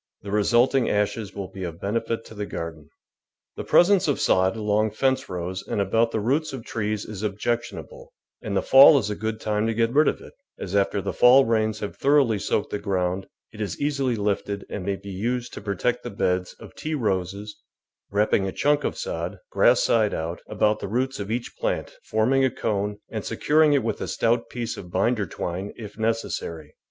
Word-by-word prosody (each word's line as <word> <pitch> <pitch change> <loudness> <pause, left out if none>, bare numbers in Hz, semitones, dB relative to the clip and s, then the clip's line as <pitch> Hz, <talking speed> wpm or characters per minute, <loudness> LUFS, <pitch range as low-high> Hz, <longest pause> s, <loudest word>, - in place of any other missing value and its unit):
The 100 - -6
resulting 120 +5 +3
ashes 105 0 -1
will 100 -2 -5
be 95 - -8
of 85 -2 -6
benefit 115 +2 -2
to - - -12
the 105 -1 -5
garden. 80 -3 -6 0.7
The - - -5
presence 185 0 +4
of 145 - +1
sod 95 +2 +3
along 105 0 0
fence 130 +3 0
rows 90 +1 -4
and - - -3
about 115 +4 +2
THE 115 - -2
VEGETABLE - - -1
GARDEN - - -5
the - - -2
roots 155 -3 -8
of 125 -4 -7
trees 105 -1 -2
is 105 -3 -7
objectionable, 120 - -4 0.3
and - - -2
the - - +1
fall 135 +2 +8
is 105 -5 -1
a - - -2
good 110 +1 -3
time 105 0 0
to 115 - -1
get 115 +1 +1
rid 150 +2 +5
of - - +1
it, - - -13 0.2
as 95 +1 -5
after 100 0 +1
the 100 - -3
fall 130 +2 +6
rains 110 -1 0
have 105 - -5
thoroughly 135 -7 +3
soaked 100 - -1
the 105 - -2
ground, 95 -1 -1 0.3
it 110 - -8
is 100 -5 -3
easily 140 -4 0
lifted 100 -1 -2
and 100 - -4
may 100 +1 -1
be 100 +1 -9
used 120 +6 -2
to - - -7
protect 105 +5 -1
the - - -6
beds 90 -2 -1
of - - -12
tea 155 0 -4
roses, 100 - -3 0.5
wrapping 100 -1 +2
a - - -2
chunk 145 +5 +1
of - - -2
sod 85 +4 -4
— - - -64
grass - - +4
side 110 -3 +2
out 80 +2 -4
— - - -26
about 105 0 +1
the - - -5
roots 130 +5 -1
of 100 0 -5
each 120 +2 -3
plant, - - -2
forming 125 +5 +2
a 130 - +4
cone, 105 -3 -2
and 110 -2 -4
securing 155 0 +3
it 140 - +2
with 115 - -2
a - - -3
stout 115 +1 0
piece 120 -2 -4
of 90 - -9
binder 100 +3 +1
twine 90 +4 -4
if 105 -3 -9
necessary. 110 -9 -3
105 Hz, 215 wpm, -24 LUFS, 100-120 Hz, 0.7 s, fall